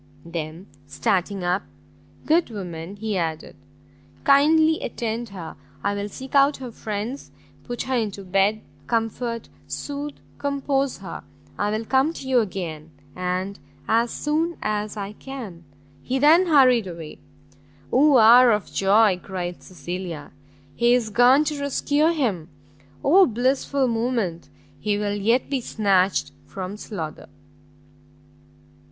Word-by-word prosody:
Then, 165 +1 -6 0.2
starting 180 +7 -1
up, 180 +3 +1 0.6
"Good 325 0 +3
woman," 180 -4 -7
he 210 -1 -3
added, 160 -2 -3 0.7
"kindly 315 +3 +5
attend 230 0 -3
her, 180 -5 -8 0.3
I 200 - +1
will 205 0 -3
seek 260 +6 -9
out 280 +1 +4
her 255 -2 -7
friends, 220 +5 -5 0.4
put 240 -1 -4
her 260 - -1
into 205 -4 -2
bed, 195 +3 +1 0.3
comfort, 230 +1 -2 0.2
sooth, 290 0 -5 0.2
compose 280 -1 -1
her. - - -7 0.3
I 205 - -1
will 215 +2 -2
come 270 +6 +2
to 270 - -8
you 260 -2 +4
again, 170 -7 -4 0.3
and 185 +2 -3 0.3
as 230 +2 +2
soon 320 +6 -1
as 210 0 -2
I 200 0 -5
can." 210 -10 -9 0.4
He 260 - -2
then 320 +7 +5
hurried 255 - +5
away. 165 -3 -8 0.7
"Oh 280 +1 +6
hour 240 +2 +8
of 210 -2 -3
joy!" 195 -1 +4
cried 180 -2 -5
Cecilia, 175 -4 -7 0.4
"he 240 +1 +4
is 230 -3 -1
gone 245 +7 +5
to 300 -1 -3
rescue 285 +2 +1
him! 230 - 0 0.5
oh 370 +6 +6
blissful 260 +3 +1
moment! 225 -7 -1 0.3
he 210 -1 0
will 205 -1 -1
yet 225 +5 +1
be 275 -2 -1
snatched 195 -4 +1 0.2
from 190 +1 -6
slaughter!" 180 -8 -7
220 Hz, 130 wpm, -23 LUFS, 190-265 Hz, 0.7 s, hour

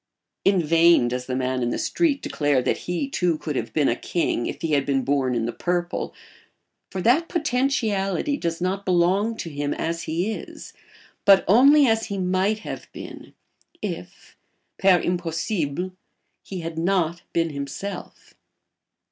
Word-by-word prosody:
In 195 -3 +3
vain 165 -4 +5
does 125 +1 -4
the 130 - -2
man 130 0 -1
in 120 - 0
the - - -2
street 320 -5 0
declare 145 -4 +1
that - - +1
he, 180 +10 -1
too, 180 - 0
could 150 -1 -4
have - - -3
been 150 -3 +2
a 120 - +2
king 165 -4 -1
if - - -6
he 165 - -1
had 140 -2 +3
been 135 -1 0
born 130 -1 +1
in 115 -1 0
the 120 - -3
purple; 175 0 -2 0.7
for 190 - -4
that 275 +9 +4
potentiality 250 - 0
does 170 -10 -3
not 185 +3 -1
belong 190 +5 +2
to 165 - -5
him 145 0 -2
as 165 +1 -2
he 170 +7 -1
is, - - -9 0.5
but 195 -1 +6
only 275 +8 +7
as 225 -2 +1
he 200 -2 -4
might 190 +3 +1
have - - -7
been, - - -10 0.4
if - - -7 0.4
per 190 -2 +5
impossibile 175 -1 -2 0.5
he 185 -3 -6
had 165 0 -5
not 170 -1 +1
been 165 -1 0
himself. 145 +7 -7
175 Hz, 160 wpm, -24 LUFS, 150-200 Hz, 0.7 s, only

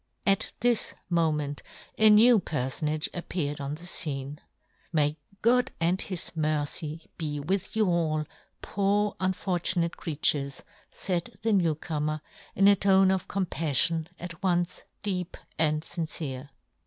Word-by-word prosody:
At 195 -1 +2
this 240 -1 +2 0.2
moment 150 -4 0 0.3
a 220 0 +6
new 220 +2 +7
perfonage 150 0 -1
ap 175 - -7
peared 145 -5 -2
on 140 +1 -3
the 160 - -11
fcene. 145 -4 0 0.3
" - - -41
May 150 -2 +2 0.3
God 250 +2 +4
" - - -36
and 175 +3 +1
His 185 -3 -3
mercy 155 +1 -1
be 150 -3 -3
with 185 +9 -2
you 220 -1 +3
all, 160 -4 0 0.2
" - - -44
poor 205 +1 +1
unfortunate 180 -2 0
creatures! 145 -3 0 0.2
" - - -30
faid 175 -3 -3
the 225 -1 +2
new 170 -6 +3
comer, 155 0 -3 0.3
in 195 - +5
a 200 - +7
tone 190 -1 +4
of 190 -1 -1
compaf 170 -5 -2
fion 160 +4 +4
at 170 -2 -8
once 175 -2 0 0.2
deep 185 -3 -3 0.2
and 155 -1 +2
iincere. 155 -5 -4
170 Hz, 150 wpm, -28 LUFS, 150-190 Hz, 0.3 s, new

